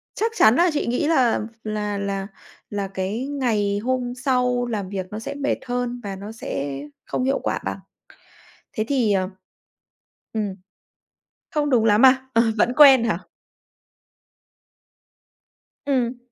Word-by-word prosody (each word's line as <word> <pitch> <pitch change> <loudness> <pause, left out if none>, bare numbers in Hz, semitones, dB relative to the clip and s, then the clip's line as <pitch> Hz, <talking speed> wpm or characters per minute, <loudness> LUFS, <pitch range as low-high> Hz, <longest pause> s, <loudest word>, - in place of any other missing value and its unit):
chắc 450 +1 0
chắn 220 +3 +6
là 350 +3 +4
chị 295 - -1
nghĩ 250 +5 0
là 260 -10 +3 0.2
là 210 -1 -2
là 195 -1 -3 0.4
là 200 -1 -3
cái 195 +6 -3
ngày 220 -8 0
hôm 250 -1 -1
sau 250 -2 +2
làm 205 -5 -3
việc 190 -2 -4
nó 210 - -5
sẽ 225 - -5
mệt 285 0 -1
hơn 245 0 -2
và 200 -1 -5
nó 200 +3 -8
sẽ 140 -10 -4 0.3
không 255 - -2
hiệu 270 +1 +1
quả - - -1
bằng. - - -3 0.9
Thế 215 -4 -1
thì, 245 -7 +2
ờ 185 -1 +1 1.1
ừm. 210 -3 -2 1.0
Không 295 -2 0
đúng 235 -5 +3
lắm 215 +4 +6
à? 260 0 +4
Ờ, 230 +1 +5
vẫn 245 +4 +2
quen 270 -5 +8
hả? 210 -7 0 2.7
Ừm. 250 -3 0
235 Hz, 145 wpm, -23 LUFS, 205-260 Hz, 2.7 s, quen